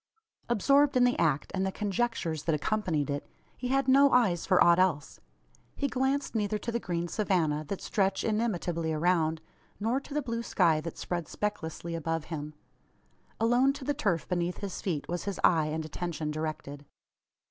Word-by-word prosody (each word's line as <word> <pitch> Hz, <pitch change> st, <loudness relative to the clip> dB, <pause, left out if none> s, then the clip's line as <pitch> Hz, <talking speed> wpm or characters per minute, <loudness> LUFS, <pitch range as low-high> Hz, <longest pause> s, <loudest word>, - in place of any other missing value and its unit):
Absorbed 275 Hz, +5 st, +4 dB
in 250 Hz, -, +5 dB
the 245 Hz, 0 st, +3 dB
act, 150 Hz, -4 st, +1 dB
and 190 Hz, -, 0 dB
the 190 Hz, -, 0 dB
conjectures 200 Hz, -7 st, -2 dB
that 160 Hz, -, +2 dB
accompanied 160 Hz, -4 st, -1 dB
it, 140 Hz, 0 st, -2 dB, 0.3 s
he 250 Hz, -, -4 dB
had 270 Hz, +1 st, +1 dB
no 275 Hz, +1 st, +6 dB
eyes 195 Hz, -9 st, +3 dB
for 185 Hz, -1 st, +4 dB
aught 170 Hz, +1 st, +5 dB
else. 170 Hz, -6 st, 0 dB, 0.6 s
He 280 Hz, -, 0 dB
glanced 270 Hz, +2 st, 0 dB
neither 210 Hz, -2 st, 0 dB
to 235 Hz, +3 st, -4 dB
the 235 Hz, -, -1 dB
green 175 Hz, -4 st, -2 dB
savannah 170 Hz, -7 st, 0 dB
that 200 Hz, -, -4 dB
stretched 195 Hz, -1 st, 0 dB
inimitably 180 Hz, -7 st, -1 dB
around, 160 Hz, -1 st, +1 dB, 0.4 s
nor 230 Hz, +5 st, +1 dB
to 280 Hz, +1 st, -10 dB
the 300 Hz, -, 0 dB
blue 230 Hz, -2 st, -3 dB
sky 170 Hz, -8 st, +2 dB
that 165 Hz, +1 st, -7 dB
spread 175 Hz, -3 st, -3 dB
specklessly 170 Hz, -5 st, -4 dB
above 165 Hz, -1 st, -2 dB
him. 150 Hz, 0 st, -5 dB, 0.8 s
Alone 245 Hz, +4 st, +3 dB
to 275 Hz, -, -8 dB
the 290 Hz, -, +1 dB
turf 200 Hz, -, -1 dB
beneath 175 Hz, 0 st, -1 dB
his 200 Hz, -3 st, -5 dB
feet 160 Hz, -7 st, -2 dB
was 175 Hz, 0 st, -3 dB
his 200 Hz, -1 st, -3 dB
eye 160 Hz, -3 st, +4 dB
and 155 Hz, +1 st, -3 dB
attention 155 Hz, -1 st, -4 dB
directed. 150 Hz, -2 st, -5 dB
180 Hz, 175 wpm, -29 LUFS, 160-230 Hz, 0.8 s, no